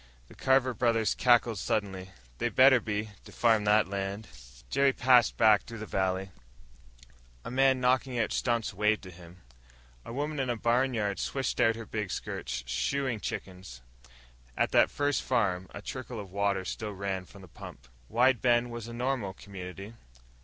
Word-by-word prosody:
The -, -, -14 dB
Carver 130 Hz, -1 st, +2 dB
brothers 115 Hz, -2 st, +1 dB
cackled 120 Hz, -4 st, +3 dB
suddenly. 95 Hz, -3 st, -2 dB, 0.3 s
"They 120 Hz, -, 0 dB
better 130 Hz, +2 st, +6 dB
be! 105 Hz, -1 st, -3 dB
To -, -, -12 dB
farm 110 Hz, -3 st, +2 dB
that 105 Hz, -1 st, +4 dB
land." 100 Hz, +2 st, -4 dB, 0.4 s
Jerry 140 Hz, 0 st, +2 dB
passed 125 Hz, -3 st, +4 dB
back 110 Hz, -3 st, +5 dB
through 115 Hz, -, -10 dB
the 110 Hz, -, -6 dB
valley. 95 Hz, -1 st, -1 dB, 1.1 s
A -, -, -5 dB
man 135 Hz, 0 st, +3 dB
knocking 125 Hz, 0 st, +1 dB
out 115 Hz, -2 st, 0 dB
stumps 120 Hz, -4 st, -1 dB
waved 105 Hz, +2 st, +1 dB
to 95 Hz, -, -10 dB
him. 85 Hz, 0 st, -15 dB, 0.6 s
A -, -, -9 dB
woman 145 Hz, +4 st, -3 dB
in 130 Hz, -2 st, -1 dB
a 120 Hz, -, 0 dB
barnyard 115 Hz, -4 st, 0 dB
swished 135 Hz, -2 st, -2 dB
out 115 Hz, -1 st, +4 dB
her 115 Hz, 0 st, -7 dB
big 105 Hz, -2 st, -4 dB
skirts, -, -, -4 dB
shooing 130 Hz, -, -1 dB
chickens. 90 Hz, -11 st, -7 dB, 0.7 s
At -, -, +1 dB
that -, -, +5 dB
first 145 Hz, 0 st, 0 dB
farm, 95 Hz, -7 st, 0 dB
a 100 Hz, -, -9 dB
trickle 130 Hz, -3 st, -6 dB
of 100 Hz, -3 st, -9 dB
water 100 Hz, -1 st, 0 dB
still 105 Hz, +2 st, -5 dB
ran 95 Hz, -1 st, -4 dB
from 100 Hz, +1 st, -15 dB
the -, -, -12 dB
pump.... 60 Hz, -6 st, -12 dB, 0.2 s
Wide 120 Hz, +2 st, +3 dB
Bend 120 Hz, -1 st, +2 dB
was 120 Hz, -1 st, -6 dB
a 115 Hz, -, -8 dB
normal 120 Hz, -5 st, -2 dB
community. 95 Hz, +1 st, -9 dB
110 Hz, 165 wpm, -29 LUFS, 100-125 Hz, 1.1 s, better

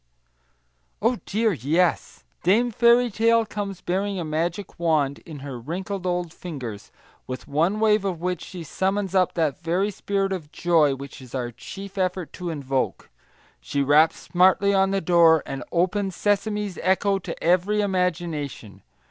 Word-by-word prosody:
Oh 230 Hz, +2 st, +1 dB
dear, 220 Hz, +1 st, +1 dB
yes! 160 Hz, +6 st, 0 dB, 0.2 s
Dame 230 Hz, +7 st, +3 dB
Fairy 235 Hz, +2 st, +4 dB
Tale 230 Hz, +2 st, +3 dB
comes 200 Hz, -3 st, -5 dB
bearing 195 Hz, +2 st, -1 dB
a 170 Hz, -, -3 dB
magic 170 Hz, +6 st, -3 dB
wand 155 Hz, -5 st, +1 dB
in 150 Hz, -4 st, -8 dB
her 130 Hz, -4 st, -6 dB
wrinkled 185 Hz, -, -4 dB
old 175 Hz, -2 st, -2 dB
fingers, 125 Hz, -, -7 dB, 0.4 s
with 130 Hz, -1 st, -6 dB
one 165 Hz, +9 st, +1 dB
wave 215 Hz, -2 st, +3 dB
of 185 Hz, -4 st, -2 dB
which 180 Hz, 0 st, -2 dB
she 180 Hz, -3 st, -8 dB
summons 190 Hz, +4 st, -1 dB
up 185 Hz, -2 st, +2 dB
that 155 Hz, -5 st, 0 dB
very 180 Hz, +5 st, 0 dB
spirit 195 Hz, 0 st, -1 dB
of 160 Hz, -5 st, -6 dB
joy 160 Hz, -5 st, +3 dB
which 140 Hz, 0 st, -10 dB
it -, -, -10 dB
is 125 Hz, -, -10 dB
our 120 Hz, -2 st, -2 dB
chief 195 Hz, -, -9 dB
effort 185 Hz, -2 st, -1 dB
to 180 Hz, -2 st, -5 dB
invoke. 135 Hz, -4 st, -2 dB, 0.5 s
She 140 Hz, -, -1 dB
raps 150 Hz, +3 st, +4 dB
smartly 190 Hz, +2 st, +3 dB
on 195 Hz, 0 st, +3 dB
the 195 Hz, 0 st, 0 dB
door, 165 Hz, -2 st, +5 dB
and 135 Hz, -1 st, -5 dB
open 185 Hz, +3 st, +1 dB
sesames 205 Hz, 0 st, -1 dB
echo 195 Hz, +1 st, +2 dB
to -, -, -7 dB
every 185 Hz, +5 st, +2 dB
imagination. 170 Hz, -, -2 dB
180 Hz, 155 wpm, -24 LUFS, 155-200 Hz, 0.5 s, door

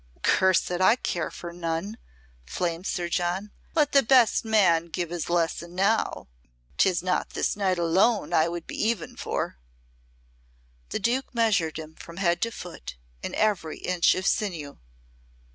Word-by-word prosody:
"Curse 190 Hz, -1 st, +3 dB
it, 180 Hz, +1 st, -1 dB
I 190 Hz, +5 st, +6 dB
care 175 Hz, -9 st, -2 dB
for 170 Hz, -1 st, -8 dB
none!" 170 Hz, +5 st, -3 dB, 0.4 s
flamed 170 Hz, -, -3 dB
Sir 175 Hz, -1 st, -2 dB
John. 180 Hz, +4 st, -1 dB, 0.2 s
"Let 305 Hz, -3 st, +3 dB
the 275 Hz, -, +6 dB
best 250 Hz, -2 st, +4 dB
man 190 Hz, -7 st, +3 dB
give 170 Hz, 0 st, -4 dB
his 175 Hz, -2 st, -4 dB
lesson 170 Hz, 0 st, -1 dB
now. 200 Hz, +4 st, +1 dB, 0.5 s
'Tis 180 Hz, -2 st, +3 dB
not 185 Hz, 0 st, 0 dB
this -, -, 0 dB
night 190 Hz, -3 st, 0 dB
alone 175 Hz, +1 st, +2 dB
I 160 Hz, -1 st, +4 dB
would 170 Hz, -1 st, -5 dB
be -, -, -7 dB
even 215 Hz, -6 st, -1 dB
for." 60 Hz, -, -3 dB, 1.3 s
The -, -, -2 dB
Duke 255 Hz, +2 st, -1 dB
measured 205 Hz, -10 st, +2 dB
him 160 Hz, 0 st, -8 dB
from 170 Hz, +1 st, -12 dB
head 175 Hz, -3 st, +1 dB
to 230 Hz, -, 0 dB
foot, 175 Hz, -, -8 dB, 0.3 s
in -, -, -5 dB
every 200 Hz, -7 st, 0 dB
inch 180 Hz, -2 st, +2 dB
of 185 Hz, -, -3 dB
sinew. 170 Hz, -11 st, -1 dB
180 Hz, 155 wpm, -26 LUFS, 170-210 Hz, 1.3 s, I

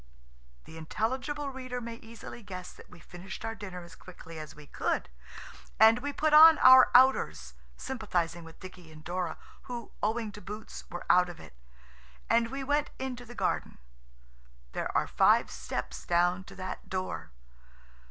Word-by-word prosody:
The 160 Hz, -, -11 dB
intelligible 260 Hz, -, -3 dB
reader 255 Hz, -1 st, -5 dB
may 230 Hz, -1 st, -7 dB
easily 230 Hz, +1 st, -11 dB
guess 185 Hz, -3 st, -8 dB
that -, -, -16 dB
we 180 Hz, -, -15 dB
finished 180 Hz, +6 st, -9 dB
our 225 Hz, -, -3 dB
dinner 190 Hz, -5 st, -8 dB
as 170 Hz, -1 st, -13 dB
quickly 165 Hz, -2 st, -11 dB
as 155 Hz, -1 st, -9 dB
we 150 Hz, -, -13 dB
could, -, -, -2 dB, 0.7 s
and 220 Hz, +2 st, +7 dB
we 285 Hz, +3 st, -3 dB
put 305 Hz, +2 st, 0 dB
on 315 Hz, +1 st, +10 dB
our 260 Hz, 0 st, +8 dB
outers, 80 Hz, -, +4 dB, 0.2 s
sympathising 175 Hz, -9 st, -2 dB
with 165 Hz, 0 st, -14 dB
Dicky 180 Hz, -3 st, -12 dB
and 155 Hz, 0 st, -14 dB
Dora, 175 Hz, 0 st, -3 dB, 0.3 s
who, 240 Hz, -2 st, -6 dB
owing 220 Hz, 0 st, -1 dB
to 210 Hz, -, -11 dB
boots, 210 Hz, +4 st, -8 dB
were 175 Hz, -, -7 dB
out 180 Hz, 0 st, +5 dB
of 170 Hz, -2 st, -10 dB
it, -, -, -13 dB, 0.8 s
and 230 Hz, 0 st, +3 dB
we 270 Hz, +2 st, -5 dB
went 290 Hz, +2 st, 0 dB
into 250 Hz, -2 st, -5 dB
the 240 Hz, +1 st, -12 dB
garden. -, -, -2 dB, 0.9 s
There -, -, -3 dB
are -, -, +2 dB
five -, -, +3 dB
steps 65 Hz, +1 st, -5 dB
down 175 Hz, +2 st, +1 dB
to -, -, -13 dB
that 185 Hz, -1 st, -7 dB
door. 185 Hz, 0 st, -4 dB
210 Hz, 160 wpm, -29 LUFS, 175-250 Hz, 0.9 s, on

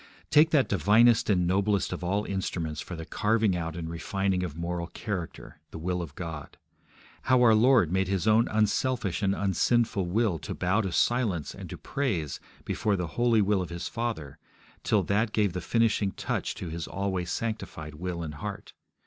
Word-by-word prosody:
Take 150 Hz, +2 st, +6 dB
that 150 Hz, -5 st, +3 dB
divinest 110 Hz, +6 st, +4 dB
and 90 Hz, -4 st, +3 dB
noblest 100 Hz, +3 st, +1 dB
of -, -, -6 dB
all 100 Hz, +4 st, 0 dB
instruments 85 Hz, -5 st, -3 dB
for 90 Hz, -, -7 dB
the 80 Hz, -1 st, -7 dB
carving 105 Hz, +1 st, +1 dB
out 80 Hz, -2 st, -3 dB
and 85 Hz, -2 st, -5 dB
refining 95 Hz, +3 st, -1 dB
of 85 Hz, -4 st, -4 dB
moral 85 Hz, 0 st, -3 dB
character, 85 Hz, -5 st, -6 dB
the -, -, -8 dB
will 90 Hz, +2 st, -2 dB
of 75 Hz, -4 st, -8 dB
God. 80 Hz, -5 st, -7 dB, 0.7 s
How 130 Hz, -1 st, +6 dB
our 115 Hz, -2 st, +7 dB
Lord 115 Hz, -, +4 dB
made 95 Hz, 0 st, +1 dB
His 95 Hz, +1 st, -1 dB
own 110 Hz, +2 st, +5 dB
unselfish 110 Hz, -2 st, 0 dB
and 100 Hz, -1 st, +1 dB
unsinful 100 Hz, 0 st, +1 dB
will 100 Hz, -2 st, +1 dB
to -, -, -6 dB
bow 95 Hz, +5 st, +1 dB
to 95 Hz, -4 st, -3 dB
silence 105 Hz, -8 st, +1 dB
and -, -, -9 dB
to -, -, -7 dB
praise 100 Hz, -, -2 dB, 0.3 s
before 105 Hz, -2 st, 0 dB
the 90 Hz, -3 st, -3 dB
holy 120 Hz, -3 st, +3 dB
will 100 Hz, -1 st, +2 dB
of 90 Hz, -, -5 dB
His 85 Hz, 0 st, -5 dB
Father, 80 Hz, -, -4 dB, 0.4 s
till -, -, +2 dB
that 110 Hz, +2 st, 0 dB
gave 105 Hz, -4 st, +1 dB
the 90 Hz, -, -3 dB
finishing 110 Hz, -2 st, +1 dB
touch -, -, -3 dB
to 90 Hz, -, -6 dB
His 80 Hz, +1 st, -5 dB
always 95 Hz, -1 st, -2 dB
sanctified 100 Hz, -10 st, -4 dB
will 85 Hz, +2 st, -4 dB
and 75 Hz, -2 st, -5 dB
heart! 75 Hz, -, -7 dB
95 Hz, 185 wpm, -28 LUFS, 85-110 Hz, 0.7 s, our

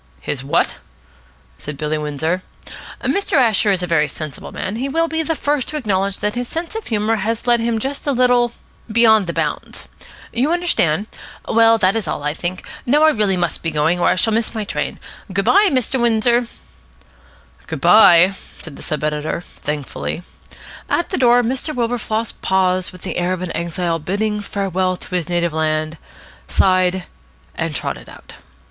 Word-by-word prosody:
"His 130 Hz, -, -4 dB
what?" 140 Hz, -, +1 dB, 0.8 s
said 150 Hz, -1 st, -7 dB
Billy 150 Hz, +1 st, -1 dB
Windsor. 150 Hz, +4 st, -2 dB, 0.6 s
"Mr. 400 Hz, 0 st, -1 dB
Asher 225 Hz, -, +4 dB
is 185 Hz, -2 st, 0 dB
a -, -, +1 dB
very 165 Hz, -3 st, +2 dB
sensible 150 Hz, 0 st, -8 dB
man, -, -, -4 dB
and 210 Hz, -, -4 dB
he 270 Hz, +2 st, -2 dB
will 330 Hz, +4 st, +1 dB
be 320 Hz, 0 st, -1 dB
the 325 Hz, 0 st, -1 dB
first 290 Hz, -3 st, 0 dB
to 305 Hz, -, -4 dB
acknowledge 200 Hz, -6 st, -1 dB
that 210 Hz, 0 st, 0 dB
his 245 Hz, 0 st, -3 dB
sense 330 Hz, -, -4 dB
of 445 Hz, -1 st, -6 dB
humour 220 Hz, 0 st, 0 dB
has 225 Hz, +3 st, -2 dB
led 240 Hz, -1 st, +3 dB
him 230 Hz, 0 st, 0 dB
just 270 Hz, +6 st, -4 dB
a -, -, +3 dB
little 245 Hz, -2 st, +3 dB, 0.4 s
beyond 220 Hz, -3 st, +5 dB
the -, -, -1 dB
bounds. -, -, -3 dB, 0.5 s
You 260 Hz, +7 st, +1 dB
understand? 215 Hz, -, +1 dB, 0.4 s
Well, 225 Hz, 0 st, +5 dB
that 190 Hz, -1 st, +2 dB
is 220 Hz, -6 st, -2 dB
all, 145 Hz, -, -3 dB
I 150 Hz, 0 st, 0 dB
think. 175 Hz, +3 st, -5 dB, 0.2 s
Now 295 Hz, +5 st, +3 dB
I 315 Hz, -, +6 dB
must 225 Hz, -, -5 dB
really 195 Hz, -3 st, +2 dB, 0.2 s
be 165 Hz, -, -1 dB
going, 155 Hz, +4 st, +1 dB
or -, -, +2 dB
I -, -, +3 dB
shall 220 Hz, +4 st, +1 dB
miss 225 Hz, +1 st, 0 dB
my 215 Hz, -, -2 dB
train. 200 Hz, -, -3 dB, 0.3 s
Good 195 Hz, +1 st, 0 dB
bye, 405 Hz, 0 st, +5 dB
Mr. 260 Hz, -2 st, 0 dB
Windsor." 235 Hz, +1 st, +2 dB, 1.2 s
"Good -, -, -5 dB
bye," 185 Hz, -3 st, +7 dB, 0.3 s
said 160 Hz, -4 st, -8 dB
the -, -, -10 dB
sub 150 Hz, -1 st, -3 dB
editor 150 Hz, +2 st, -2 dB
thankfully. 150 Hz, +1 st, -5 dB, 0.7 s
At 345 Hz, -, 0 dB
the -, -, 0 dB
door 245 Hz, -1 st, +5 dB
Mr. 265 Hz, +6 st, -2 dB
Wilberfloss 230 Hz, -2 st, -1 dB
paused 185 Hz, -1 st, +1 dB
with 185 Hz, -1 st, -13 dB
the -, -, -4 dB
air 175 Hz, +1 st, 0 dB
of 185 Hz, 0 st, -4 dB
an 180 Hz, -, -4 dB
exile 170 Hz, 0 st, -1 dB
bidding 210 Hz, +6 st, -1 dB
farewell 190 Hz, -2 st, -1 dB
to -, -, -9 dB
his 180 Hz, -1 st, -1 dB
native 170 Hz, -2 st, 0 dB
land, 155 Hz, 0 st, -1 dB, 0.5 s
sighed, 185 Hz, -, +2 dB, 0.5 s
and 160 Hz, -2 st, -3 dB
trotted -, -, -4 dB
out. -, -, -13 dB
200 Hz, 180 wpm, -19 LUFS, 170-240 Hz, 1.2 s, bye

